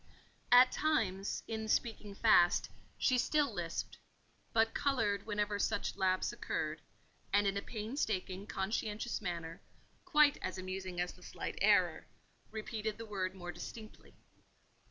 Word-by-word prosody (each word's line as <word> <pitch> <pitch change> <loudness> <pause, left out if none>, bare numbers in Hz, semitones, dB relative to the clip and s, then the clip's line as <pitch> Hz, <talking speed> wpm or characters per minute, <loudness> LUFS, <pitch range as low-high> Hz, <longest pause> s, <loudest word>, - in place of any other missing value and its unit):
At 250 +1 +8
times, 205 -11 0
in 220 -1 -3
speaking 215 -2 -1
fast, 200 -6 +5 0.3
she 255 -1 +3
still 295 +3 +2
lisped; - - -4 0.5
but 225 0 +3
coloured 225 -8 0
whenever 210 -1 -1
such 205 - 0
lapse 185 -1 +1
occurred, - - -3 0.5
and 205 +1 +4
in 195 0 +1
a 200 - -1
painstaking, 210 -4 -3
conscientious 210 +4 -2
manner, 170 -2 -4 0.4
quite 300 -1 +4
as 185 0 -3
amusing 185 -1 -5
as 180 0 -1
the - - -19
slight - - -6
error, - - +4 0.4
repeated 215 0 -4
the 230 - -7
word 190 -3 -3
more 175 -1 -6
distinctly. 220 +3 -10
210 Hz, 130 wpm, -34 LUFS, 190-225 Hz, 0.5 s, At